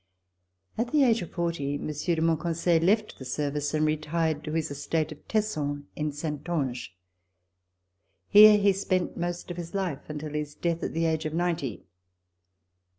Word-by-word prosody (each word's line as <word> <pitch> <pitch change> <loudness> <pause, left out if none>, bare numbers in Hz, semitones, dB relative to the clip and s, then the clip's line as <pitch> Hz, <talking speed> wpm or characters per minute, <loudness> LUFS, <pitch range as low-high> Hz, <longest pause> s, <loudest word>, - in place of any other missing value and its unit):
At 240 +1 -1
the 300 -2 +4
age 230 -4 +3
of 175 - -6
forty, 165 -5 -2
Monsieur 155 +4 -2
de 160 - 0
Monconseil 165 +1 +2
left 210 +5 +1
the - - -7
service 145 +2 -2
and 155 0 +2
retired 155 0 0
to 155 - -5
his 160 -2 -1
estate 150 +3 -1
of 150 - -12
Tesson 150 -10 -1
in 150 0 -2
Saintonge. 145 - -3 1.3
Here 210 0 +9
he 200 -1 +4
spent 185 -2 -1
most 175 +1 -4
of 175 - -6
his 170 +2 -6
life 180 -9 -3
until 150 0 -5
his 150 -1 -3
death 170 0 -1
at - - -3
the 165 +1 0
age 160 -1 0
of 155 +1 -3
ninety. 165 -9 -1
160 Hz, 160 wpm, -27 LUFS, 150-175 Hz, 1.3 s, Here